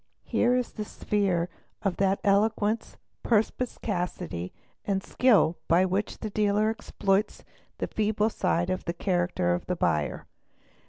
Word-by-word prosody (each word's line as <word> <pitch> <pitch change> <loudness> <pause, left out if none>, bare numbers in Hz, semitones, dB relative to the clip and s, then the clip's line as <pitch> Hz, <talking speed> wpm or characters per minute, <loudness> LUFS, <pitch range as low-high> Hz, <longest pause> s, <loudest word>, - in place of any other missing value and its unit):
Here 245 +1 +2
is 250 -1 -1
the 215 - -5
sphere 195 -5 0 0.4
of 195 -3 0
that 195 +1 +2
eloquence, 210 +2 +1 0.2
perspicacity, 190 - -1 0.3
and 195 -1 -1
skill 210 -9 +3
by 175 +3 +4
which 190 +3 -1
the 215 - -4
dealer 210 +1 +2
exploits 205 -2 -1 0.3
the - - -1
feeble 215 0 0
side 175 -2 0
of 185 - -3
the 170 - -1
character 175 - 0
of 90 - -3
the - - 0
buyer. 75 -1 0
200 Hz, 130 wpm, -27 LUFS, 175-215 Hz, 0.4 s, by